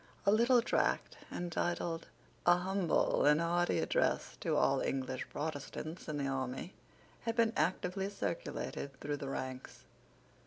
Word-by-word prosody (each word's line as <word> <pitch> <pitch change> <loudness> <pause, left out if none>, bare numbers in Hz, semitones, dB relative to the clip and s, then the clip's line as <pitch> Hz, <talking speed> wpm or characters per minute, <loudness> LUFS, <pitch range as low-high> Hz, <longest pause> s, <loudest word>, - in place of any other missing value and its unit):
A 200 - +6
little 235 +3 +5
tract, - - +1 0.2
entitled 170 -1 -2 0.4
A 175 0 +7
humble 185 -1 +2
and 150 +1 +6
hearty 175 +1 +2
Address - - +1
to - - 0
all - - +3
English 130 -1 -2
Protestants 155 +2 -5
in 155 -2 -2
the 140 - -1
Army, 130 +6 -3 0.5
had 230 -1 0
been 230 -1 +3
actively 190 +1 0
circulated 140 -7 -4
through 145 0 -2
the 140 -1 -5
ranks. 130 -1 -5
170 Hz, 130 wpm, -34 LUFS, 140-190 Hz, 0.5 s, A